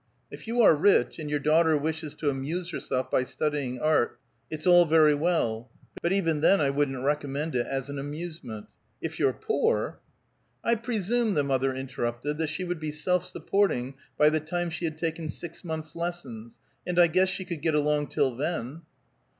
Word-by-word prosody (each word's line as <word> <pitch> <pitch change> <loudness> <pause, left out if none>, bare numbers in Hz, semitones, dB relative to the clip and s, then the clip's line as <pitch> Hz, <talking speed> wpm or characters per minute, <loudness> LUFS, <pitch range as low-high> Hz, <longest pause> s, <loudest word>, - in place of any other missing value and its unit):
If - - -10
you 235 +1 +2
are 200 - +8
rich, 160 -5 +3
and 150 -2 -5
your 150 - +1
daughter 155 +2 +3
wishes 155 0 -3
to 150 -2 0
amuse 160 +7 -3
herself 130 -5 -3
by 125 - +3
studying 140 -2 -2
art, 155 -4 +2 0.3
it's 155 -1 -5
all 175 -1 +7
very 155 -1 +5
well; 145 -8 0 0.3
but 170 - 0
even 165 -6 +1
then 195 +5 +5
I 140 -2 +2
wouldn't 135 -2 -1
recommend 145 +1 -1
it 120 -1 0
as 135 -1 -3
an 140 0 -5
amusement. 145 -6 -6 0.3
If - - -5
you're - - +3
poor - - 0 0.3
" 120 +2 -44
"I 235 - +3
presume," 230 -1 0
the 145 - +2
mother 135 -1 0
interrupted, 130 +2 -3
"that 160 - 0
she 185 - -3
would 175 -2 -3
be 155 -1 -3
self 180 +4 0
supporting 140 -11 0 0.2
by 150 0 +5
the 155 - +1
time 175 +2 -3
she 170 +1 -3
had 155 -1 -3
taken 165 -1 -3
six 170 +1 -7
months' 160 -2 -5
lessons, 140 -10 -5 0.3
and 180 -1 -3
I 175 - +8
guess 185 +3 +3
she 190 0 -3
could 170 -5 -5
get 160 -1 +1
along 150 0 +1
till 130 -3 0
then." 150 +1 -3
155 Hz, 190 wpm, -27 LUFS, 140-170 Hz, 0.3 s, are